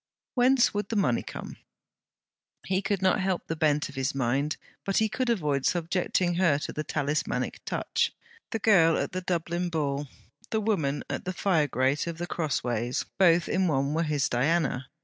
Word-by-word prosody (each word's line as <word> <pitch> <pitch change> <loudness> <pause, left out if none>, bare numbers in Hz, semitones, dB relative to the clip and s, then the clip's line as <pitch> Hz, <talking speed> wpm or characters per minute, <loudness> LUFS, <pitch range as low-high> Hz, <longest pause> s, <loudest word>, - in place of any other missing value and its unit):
Whence 255 0 +4
would 205 -1 -2
the 230 - -2
money 190 - +2
come? - - -8 1.1
He 190 0 0
could 200 -2 -1
not 185 +2 +3
help 190 -2 -1
the 160 - -3
bent 150 -1 +1
of 140 - -11
his 135 0 -2
mind; 135 +4 0 0.3
but 195 - -1
he 220 - +4
could 240 +4 -2
avoid 150 - +1
subjecting 175 +1 +1
her 170 -5 +3
to 145 - -5
the 155 - -3
talismanic 150 0 -2
touch. - - 0 0.4
The 225 - -1
girl 185 -7 +5
at - - -2
the 185 - -3
Dublin 175 0 -1
Ball, 145 -3 -1 0.4
the 220 - 0
woman 165 -10 0
at - - -4
the 185 - -2
fire 175 -5 +2
grate 135 +4 0
of 170 -1 -4
The 175 - -3
Crossways, 125 -8 -1
both 170 -3 +5
in 185 0 +1
one 140 -2 +1
were 160 - +1
his 150 -5 +1
Diana. 135 0 0
165 Hz, 180 wpm, -27 LUFS, 145-190 Hz, 1.1 s, girl